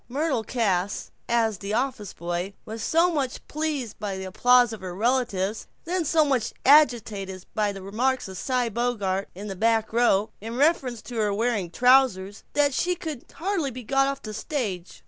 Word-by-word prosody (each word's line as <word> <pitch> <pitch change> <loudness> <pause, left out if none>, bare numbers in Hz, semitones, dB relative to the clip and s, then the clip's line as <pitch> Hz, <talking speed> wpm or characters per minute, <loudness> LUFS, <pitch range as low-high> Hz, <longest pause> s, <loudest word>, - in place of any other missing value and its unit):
Myrtle 275 -2 0
Cass, 205 -5 -1 0.2
as 225 -4 +1
the 200 +2 -3
office 235 -5 -2
boy, 175 +3 -4
was 220 +1 -6
so 335 +8 +3
much 275 -5 -3
pleased 295 -7 -3
by 200 -2 -3
the 190 - -5
applause 245 +5 +4
of 220 - -8
her 180 -2 -6
relatives, 220 -3 0 0.2
then 350 0 -1
so 310 +1 +3
much 260 -6 0
agitated 220 -10 +3
by 210 -1 +1
the 195 -1 -9
remarks 245 +7 0
of 190 - -8
Cy 250 -2 0
Bogart, 215 -4 -1
in 200 +3 -7
the 195 -2 -5
back 220 +2 +1
row, 220 -3 +3
in 225 +2 -6
reference 270 -6 +1
to 245 - -7
her 210 -2 +1
wearing 210 -3 0
trousers, 230 -3 +3
that 290 -1 +3
she 360 +6 +1
could 315 -7 -6
hardly 345 -4 -1
be 255 0 -8
got 270 +4 +2
off 275 0 -4
the 215 - -6
stage. 210 - -4
230 Hz, 180 wpm, -25 LUFS, 200-270 Hz, 0.2 s, applause